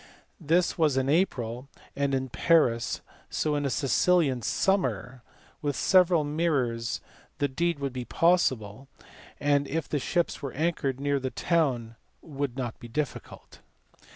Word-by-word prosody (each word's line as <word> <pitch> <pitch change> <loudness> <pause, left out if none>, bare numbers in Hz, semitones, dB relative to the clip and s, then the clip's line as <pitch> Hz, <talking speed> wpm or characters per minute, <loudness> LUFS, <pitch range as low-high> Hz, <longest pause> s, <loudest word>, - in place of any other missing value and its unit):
This 170 +2 +1
was 150 -5 +3
in 135 0 +1
April 130 -7 0 0.3
and 140 -1 0
in 130 0 -2
Paris, 125 -7 +2 0.3
so 155 - -1
in 145 -1 -1
a - - -1
Sicilian 140 0 +2
summer 130 - 0
and - - -32 0.3
with 145 -2 -1
several 180 -2 +4
mirrors 140 -7 -1 0.4
the 145 - +1
deed 170 +5 -1
would 140 -2 -3
be 125 -1 -5
possible, 135 - +1 0.5
and 145 -1 +2
if 160 0 -2
the 145 - -1
ships 170 +6 -1
were 140 -3 -5
anchored 145 -4 -1
near 140 0 0
the 130 0 -3
town 125 -9 0 0.3
would 140 -4 -4
not 120 -4 -4
be 120 - -9
difficult. 140 +4 -5
140 Hz, 145 wpm, -27 LUFS, 125-165 Hz, 0.5 s, several